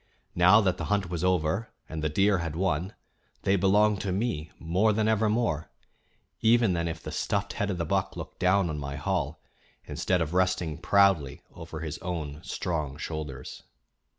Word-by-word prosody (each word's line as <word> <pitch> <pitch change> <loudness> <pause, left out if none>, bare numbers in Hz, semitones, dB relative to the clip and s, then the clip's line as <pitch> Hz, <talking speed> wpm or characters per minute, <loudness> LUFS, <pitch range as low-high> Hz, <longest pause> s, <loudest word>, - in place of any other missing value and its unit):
Now 95 +5 +6
that 95 -3 +1
the 85 - -4
hunt 100 -2 0
was 85 -1 -2
over 90 +4 +1 0.2
and 80 -1 -5
the 75 - +1
deer 95 +4 +3
had 85 -2 -4
won, 90 +1 -1 0.5
they 95 - +3
belonged 100 +2 +3
to 100 - -2
me 95 -6 -2
more 95 +7 +2
than 110 +1 +1
ever 110 0 +2
more 105 -9 0 0.7
even 115 -3 +4
than 85 -1 -1
if 80 0 -5
the - - -6
stuffed 100 0 -1
head 100 -3 -1
of 95 - -2
the 85 - -1
buck - - -1
looked - - -8
down 95 0 +3
on 75 - -4
my 70 -1 -5
hall, 80 -1 -2 0.4
instead 90 -1 0
of 80 0 -2
resting 90 -3 +1
proudly 90 -6 +3
over 80 -1 -8
his 80 -2 -5
own 80 -4 -5
strong 75 -5 -3
shoulders. 75 -4 -6
90 Hz, 180 wpm, -28 LUFS, 80-100 Hz, 0.7 s, Now